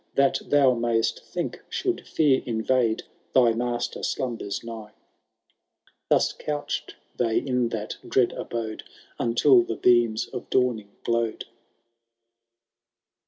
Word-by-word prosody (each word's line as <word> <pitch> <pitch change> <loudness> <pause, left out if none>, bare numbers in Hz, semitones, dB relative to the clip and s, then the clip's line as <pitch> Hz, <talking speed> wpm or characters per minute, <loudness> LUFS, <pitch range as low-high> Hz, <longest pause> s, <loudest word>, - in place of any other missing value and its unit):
That 140 -1 +3
thou 140 -3 +4
mayst 115 -1 0
think, - - -4
should - - -2
fear 145 -4 +3
invade. 115 0 +1 0.3
Thy 120 -3 +6
master 120 0 -2
slimibers 120 -6 -3
nigh. 110 -2 -8 1.2
Thus - - +3
couchM 150 -1 -4 0.2
they 115 -2 +1
in 125 -3 +1
that 110 -2 -4
dread 125 -2 +3
abode. 115 -2 -5 0.4
Until 120 +2 +5
the 115 -1 -3
beams 120 -2 +3
of - - -8
dawning 120 -5 +1
glowed. 115 -1 -1
120 Hz, 110 wpm, -25 LUFS, 115-125 Hz, 1.2 s, Thy